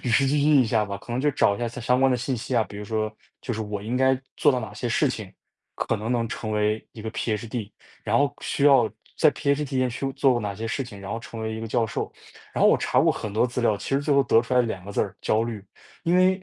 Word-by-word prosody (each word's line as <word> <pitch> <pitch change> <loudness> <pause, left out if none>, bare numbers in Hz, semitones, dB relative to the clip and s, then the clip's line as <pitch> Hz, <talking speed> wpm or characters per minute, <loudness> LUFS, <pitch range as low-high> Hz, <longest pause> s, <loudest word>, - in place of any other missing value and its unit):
与 - - -2
时 130 +4 +4
俱 145 +2 +2
进 145 -2 +5
一 - - 0
下 110 -1 +2
吧， 100 -1 -4
可 120 - -9
能 120 - 0
就 150 +2 +2
找 100 - +3
一 - - -8
下 120 -1 -1
相 125 +2 0
关 135 0 +5
的 125 - +2
信 130 +2 -2
息 120 +1 -3
啊， 110 - +3
比 100 +1 -10
如 105 - -6
说 110 0 -2 0.3
就 120 - -3
是 110 - -3
我 105 -1 -4
应 120 +4 -2
该 130 0 +3 0.2
做 150 - +4
到 125 -2 0
哪 110 -2 -7
些 120 +3 -4
事 130 +4 +2
情， 110 -6 -6 0.4
可 - - -1
能 110 +3 -3
能 120 -2 +1
成 110 -1 -4
为 105 +1 +1
一 110 - -10
个 110 - -4
PhD， 110 -1 -3 0.3
然 110 +2 +2
后 140 0 +2
需 140 - -1
要 135 -6 +6 0.3
在 - - +5
PhD 140 +1 0
间 130 -2 0
去 135 +3 -3
做 130 -3 +3
哪 100 -2 -3
些 115 - -4
事 135 +4 -2
情， 105 -6 -10
然 100 - -8
后 115 - -3
成 115 0 -8
为 110 0 -3
一 110 - -5
个 115 - -5
教 115 0 +1
授。 105 - -3 0.4
然 - - -3
后 - - +7
我 - - +5
查 - - +1
过 - - +4
很 105 - -5
多 110 +4 +3
资 125 0 -3
料， 110 -3 +2
其 - - -7
实 135 +1 +2
最 145 +1 0
后 140 0 +5
得 115 -1 +5
出 120 - -7
来 125 - +5
2 105 -6 -4
个 100 - -7
字 - - 0
儿， 95 -1 -2
焦 110 +1 +1
虑， 110 -4 -6 0.4
因 175 +1 +2
为 185 +1 +3
115 Hz, 325 characters per minute, -25 LUFS, 110-130 Hz, 0.4 s, 后